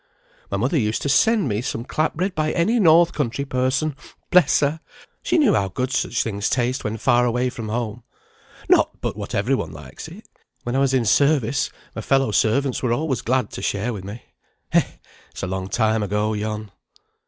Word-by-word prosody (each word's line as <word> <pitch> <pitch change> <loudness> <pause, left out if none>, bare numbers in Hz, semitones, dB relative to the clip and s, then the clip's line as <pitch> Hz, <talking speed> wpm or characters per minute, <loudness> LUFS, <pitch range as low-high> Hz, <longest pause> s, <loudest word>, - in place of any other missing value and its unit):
"My 100 - -1
mother 130 - +1
used 110 -2 -1
to 140 - -1
send 220 +5 +3
me 105 -2 -1
some 115 -1 -4
clap 155 +4 -1
bread 185 +4 -1
by 155 -1 0
any 215 +8 +2
north 170 -2 +5
country 140 -1 -2
person 130 +3 0 0.4
bless 180 0 +5
her! 150 +2 0 0.4
She - - +1
knew 280 -11 +4
how 100 - +1
good 130 +8 -3
such 130 -2 0
things 100 -2 -2
taste 125 +1 0
when 105 +1 -3
far 120 0 +3
away 125 +1 0
from 115 -3 -6
home. 115 0 -3 0.7
Not - - +3
but - - -3
what - - -6
every 110 +7 +1
one 130 - -1
likes 75 -5 -10
it. - - -13 0.4
When 120 +1 -3
I - - +2
was 135 -1 +2
in 125 -3 +1
service 135 +2 +2 0.3
my - - -4
fellow 135 -4 +2
servants 120 +6 +1
were 120 -2 +1
always 140 -1 -1
glad 130 +2 0
to - - -7
share 105 +5 -1
with 100 -4 -7
me. 100 +4 -8 0.5
Eh, - - +6 0.5
it's - - -9
a - - +1
long 95 0 -3
time 110 0 +1
ago, 105 +2 0
yon." 105 0 -4
125 Hz, 200 wpm, -22 LUFS, 110-140 Hz, 0.7 s, Eh